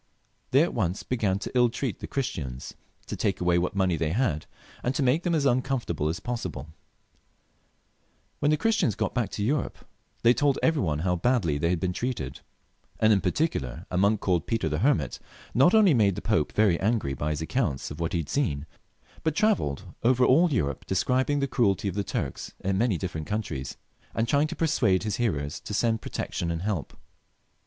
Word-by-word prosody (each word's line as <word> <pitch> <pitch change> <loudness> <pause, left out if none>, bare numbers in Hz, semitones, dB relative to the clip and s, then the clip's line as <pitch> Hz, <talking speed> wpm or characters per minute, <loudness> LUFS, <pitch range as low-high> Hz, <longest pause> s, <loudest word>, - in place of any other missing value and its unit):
They 135 +4 +5
at 170 - -1
once 95 -5 -1
began 105 -6 0
to 100 - -6
ill 125 -1 +4
treat 120 -3 -3
the - - -6
Christians, 80 - -4 0.3
to - - -5
take - - -1
away 90 -1 +3
what 90 +3 -2
money 95 -4 +2
they 80 0 -1
had, 105 - 0 0.3
and 125 +2 -1
to 145 - +1
make 130 +6 +3
them 175 -1 0
as 145 -3 +1
uncomfortable 125 - 0
as 80 - -3
possibla 120 - -4 1.7
When 145 - +2
the 155 - +3
Christians 220 - +1
got - - -2
back 120 -4 0
to 100 - -2
Europe 140 +6 -2 0.4
they 120 +1 +6
told 140 +1 +2
every 160 -2 +3
one 75 -5 -1
how 90 -1 +1
badly 85 - +1
they 85 - +1
had 90 -1 +1
been 90 +1 -1
treated; 95 - -3 0.6
and 110 0 +5
in 100 - +2
particular 65 - -1
a 90 - -1
monk 100 +2 +3
called 90 -3 0
Peter 115 -8 0
the 75 0 -1
Hermit 100 - +1 0.3
not 140 - +5
only 205 -6 +6
made 105 -6 +3
the - - -5
Pope 110 -9 +1
very 100 -6 +3
angry 105 -10 0
by 75 +3 -2
his 75 +1 -2
account 80 - -1
of 75 - -8
what 85 -1 -2
he - - +2
had 75 - -9
seen, 75 - 0 0.6
but 160 -2 0
tra 215 +2 +4
velled 70 - -4 0.2
over 125 +1 +4
all 165 +6 +5
Europe 70 - -1
describing 130 +8 +1
the 140 - +1
cruelty 105 -7 +1
of 95 - -1
the 100 +1 -1
Turks 70 -8 -4
in 95 0 0
many 105 -2 +2
different 80 -4 -4
countries, 100 -11 -4 0.4
and 115 +1 +1
trying 145 +4 +3
to - - -6
persuade 120 - +2
his 105 -3 -2
hearers 75 -12 -1
to 105 - -5
send 115 0 +1
protection 85 - -3
and 85 +1 -2
help. 100 -8 -3
105 Hz, 200 wpm, -27 LUFS, 85-130 Hz, 1.7 s, they